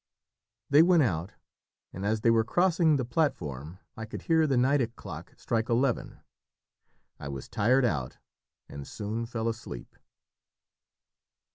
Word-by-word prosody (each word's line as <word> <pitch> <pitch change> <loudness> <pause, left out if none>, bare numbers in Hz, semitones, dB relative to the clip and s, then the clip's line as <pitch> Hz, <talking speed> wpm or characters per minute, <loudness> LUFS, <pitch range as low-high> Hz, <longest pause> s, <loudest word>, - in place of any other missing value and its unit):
They 145 +2 +8
went 170 -2 +5
out, 90 -4 -2 0.6
and 95 - -6
as 110 0 0
they 115 - +4
were 115 -1 +4
crossing 170 +3 +3
the 130 -3 -1
platform 85 - -2 0.2
I 110 - -6
could 110 - -8
hear 160 -2 +3
the 135 -3 +1
Nideck 125 -2 +2
clock - - -9
strike 115 0 -1
eleven. 125 +1 0 1.0
I 70 - -7
was 70 -1 -6
tired 125 +5 +2
out 70 - -2 0.5
and 70 -1 -9
soon 110 +2 -4
fell 115 -1 -3
asleep. 115 - -6
115 Hz, 135 wpm, -28 LUFS, 100-140 Hz, 1.0 s, They